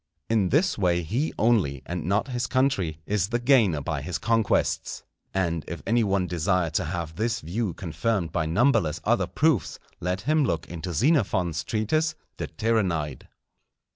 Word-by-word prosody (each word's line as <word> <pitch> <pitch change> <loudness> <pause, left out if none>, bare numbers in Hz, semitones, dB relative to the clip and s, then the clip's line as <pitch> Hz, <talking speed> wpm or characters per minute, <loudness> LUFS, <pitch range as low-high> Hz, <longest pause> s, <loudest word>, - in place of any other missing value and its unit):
In 105 -5 +2
this 160 - +2
way 90 -2 +2
he 120 - -1
only, 100 - +2
and 85 -3 -4
not 100 +8 0
his 120 -2 -2
country, 130 - +1
is 100 -2 0
the 120 +3 0
gainer 120 - +3
by - - -3
his - - -3
conquests. 115 -2 0 0.3
And 85 -5 -1
if - - -6
any 115 +2 +2
one 100 -2 +1
desire 90 -1 0
to 80 - 0
have 85 -1 -4
this 115 +2 0
view 100 +1 -3
confirmed 95 0 -2
by 80 -2 -1
numberless 85 - +2
other - - +2
proofs, - - +1 0.2
let 90 +2 -2
him 155 +6 +2
look 85 - -1
into 85 +1 -5
Xenophon's 95 - +1
treatise 155 +9 0 0.2
De - - -3
Tirannide. 90 - -1
95 Hz, 160 wpm, -26 LUFS, 85-115 Hz, 0.3 s, gainer